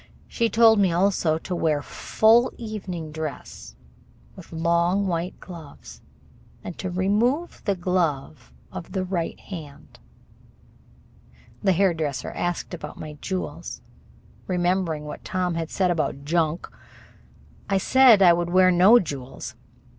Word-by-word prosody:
She 230 -2 0
told 225 -1 +5
me 190 -3 +3
also 175 -3 +2
to 180 +2 -5
wear 155 -4 0
full 230 +3 +3
evening 190 -8 -6
dress, 155 - -7 0.6
with - - -13
long 170 +4 +1
white 175 0 -3
gloves, 165 -6 -12 0.6
and 180 - -7
to 185 - -3
remove 215 - 0
the 200 -2 +1
glove 170 - -2 0.2
of 165 - -8
the 190 -2 -1
right 180 -3 -3
hand. 155 -7 -10 1.6
The 190 -2 +3
hairdresser 165 -6 0
asked 175 +1 -3
about 175 - -7
my 155 -1 -7
jewels. 185 -2 -5 0.7
Remembering 175 -4 0
what 150 - -8
Tom 180 -1 -1
had 165 -1 -3
said 185 -2 +1
about 155 -4 -2
"junk", 165 +1 0 1.0
I 195 - +2
said 240 0 +6
I 175 -2 +8
would 175 0 -1
wear 185 +1 +5
no 185 +7 +7
jewels. 135 - -5
180 Hz, 125 wpm, -24 LUFS, 160-195 Hz, 1.6 s, I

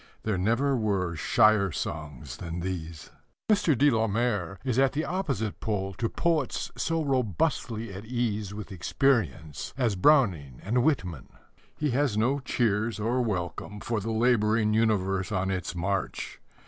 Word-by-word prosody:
There 110 -2 0
never 115 +9 +2
were 100 -7 0
shyer 105 +3 +4
songs 75 -4 -5
than 85 0 -5
these. 85 -3 -5 0.4
Mr. 170 - +3
de 145 +3 +5
la 115 -1 +2
Mare 105 -4 -1
is 130 -1 +1
at 135 -1 +4
the 155 +3 -1
opposite 135 - -2
pole 95 -3 -2
to 115 -2 0
poets 160 -7 0
so 165 -1 0
robustly 125 - -1
at 100 +3 -8
ease 110 -4 -1
with 105 0 -7
experience 90 - 0
as 120 -6 +1
Browning 90 - +3
and 120 +5 +1
Whitman. 90 - -1 0.5
He 150 -2 0
has 130 -4 +1
no 130 +6 +2
cheers 115 -4 0
or 120 +4 +1
welcome 105 -1 -3
for 115 +1 -2
the 110 +3 -4
labouring 110 -2 +2
universe 95 -4 +1
on 95 -1 0
its 90 -1 -3
march. 95 +2 -3
110 Hz, 150 wpm, -28 LUFS, 95-125 Hz, 0.5 s, de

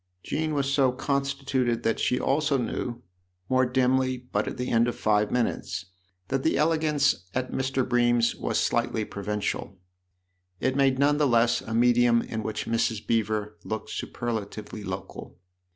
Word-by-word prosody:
Jean 155 0 -2
was 140 -1 0
so 135 -3 +4
constituted 135 -2 -1
that 115 - +1
she 125 - +1
also 140 0 +1
knew, 120 -1 -3 0.5
more 130 0 +3
dimly 130 0 +2
but 125 0 -3
at - - -4
the 125 0 -3
end 115 0 +4
of 120 - -2
five 105 -1 +2
minutes, 120 -4 -1 0.4
that 135 0 0
the 160 - +1
elegance 150 - +2
at 130 0 -1
Mr. 130 -1 -1
Bream's 120 -1 +3
was - - -2
slightly 110 - 0
provincial. 100 -1 -3 0.8
It 130 0 0
made 135 -2 +3
none 145 +2 +3
the 150 -1 +3
less 120 -1 +3
a 110 - -4
medium 120 0 +4
in 110 - -4
which 110 0 -3
Mrs. 115 -1 0
Beever 105 -2 -1
looked 110 0 -5
superlatively 110 -2 -5
local. 95 -1 -7
125 Hz, 150 wpm, -26 LUFS, 110-135 Hz, 0.8 s, so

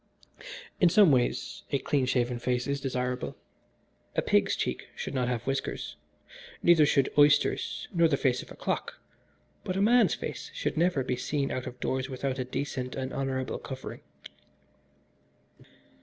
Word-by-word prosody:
"In 180 - +6
some 195 -2 +6
ways 125 -2 0
a 140 - +1
clean 135 0 0
shaved 120 -1 0
face 125 0 0
is 140 -1 -2
desirable. 125 -1 -2 0.8
A - - +1
pig's - - +3
cheek 65 - -3
should - - -5
not 125 -2 0
have 120 -2 -1
whiskers, 135 0 -3 0.7
neither 165 -4 +6
should 140 -2 +2
oysters 145 0 +3
nor 170 -2 +5
the 145 -3 +1
face 125 -2 +1
of - - -13
a - - -10
clock, - - -3 0.6
but 185 - -2
a - - +1
man's 240 +3 +5
face - - -6
should - - -2
never 165 -4 +2
be 125 0 -1
seen 135 +3 -1
out 130 - -3
of 125 - -8
doors 130 +2 -1
without 130 0 -3
a - - 0
decent 130 -1 -4
and 130 0 -4
honourable 135 -1 -2
covering." 130 -1 -7
135 Hz, 155 wpm, -29 LUFS, 125-145 Hz, 0.8 s, In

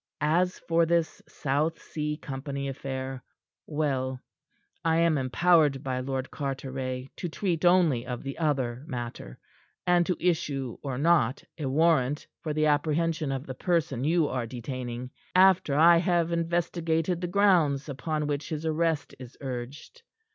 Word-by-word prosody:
"As 175 +4 +2
for 165 0 +1
this 170 -1 0
South 150 +4 -1
Sea 150 -1 -4
Company 140 -1 -5
affair, 135 -1 -5 0.4
well 135 -4 -1 0.6
I 165 0 +2
am 165 -1 +3
empowered 145 +1 +3
by 130 -1 -2
Lord 130 0 -3
Carteret 130 -2 -4
to 175 - -3
treat 170 -1 -2
only 170 -9 +4
of 125 -1 -4
the 135 +3 -6
other 130 -5 0
matter, 120 - -6 0.5
and 175 -1 +4
to 180 - 0
issue 145 -8 -1
or 135 -3 -4
not 145 -4 +2 0.2
a 145 - -2
warrant 145 -1 +2 0.2
for 155 -1 -3
the 155 +1 +1
apprehension 155 0 +1
of 135 +1 -3
the 130 - -5
person 145 -4 0
you 160 +1 +3
are 125 -4 -2
detaining, 125 0 -5 0.2
after 185 -6 +5
I 170 +3 +7
have 170 -1 +1
investigated 170 0 0
the 175 - -1
grounds 175 -8 +3
upon 150 +2 -2
which 145 0 -3
his 155 0 -4
arrest 160 -2 0
is 125 0 -11
urged. 135 - -7
150 Hz, 145 wpm, -28 LUFS, 130-165 Hz, 0.6 s, I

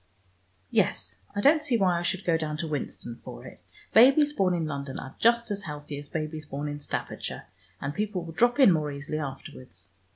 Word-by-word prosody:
Yes, - - +1 0.2
I 205 - 0
don't 305 +6 +5
see 280 -6 +1
why 180 -4 +2
I - - -3
should 185 +2 -1
go 170 - +3
down 155 -1 -2
to 165 +1 -3
Winston 135 -5 -4
for - - -9
it. - - -12 0.3
Babies 275 +5 +7
born 185 -7 +2
in 165 -2 -1
London 140 -3 -4
are 135 - -7
just 235 -1 +3
as 200 -1 -3
healthy 150 -1 -6
as 145 0 -10
babies 155 -1 -4
born 145 +1 -4
in 145 0 -4
Staffordshire, 145 - -5 0.3
and 140 +1 -3
people 205 -1 -2
will 165 -1 -8
drop 240 - +3
in 260 -8 +8
more 155 -3 +1
easily 145 +2 -4
afterwards. 135 - -8
160 Hz, 200 wpm, -27 LUFS, 145-205 Hz, 0.3 s, in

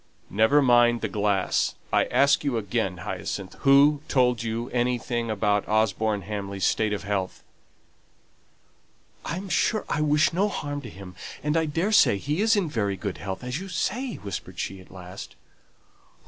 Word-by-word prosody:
"Never 110 +8 +4
mind 120 -2 +4
the - - -1
glass. 100 -3 0 0.2
I - - +4
ask 140 +1 +3
you 140 -5 0
again, 100 -4 -2
Hyacinth, 95 -1 -5
who 140 +1 +5
told 125 -4 +2
you 115 +1 -3
anything 120 -1 -1
about 105 -1 0
Osborne 110 -1 +1
Hamley's 100 -2 -3
state 110 -1 +1
of 105 - -3
health?" 100 -2 -3 1.8
"I 170 - -3
am 195 +2 -6
sure 200 +5 +1
I 150 - -1
wish 150 +2 +3
no 195 +4 +2
harm 145 -6 -4
to 120 - -9
him, 95 -2 -11 0.3
and 150 +1 0
I 160 -1 +2
daresay 165 - +3
he 150 - -2
is 220 +1 +4
in 200 -5 +1
very 100 -8 -1
good 100 -2 -5
health, 95 +1 -5
as 125 +4 -3
you 195 - -7
say," 225 +9 -2
whispered 100 -3 -7
she, 95 -1 -4
at 90 - -18
last. 90 0 -10
115 Hz, 160 wpm, -25 LUFS, 100-145 Hz, 1.8 s, who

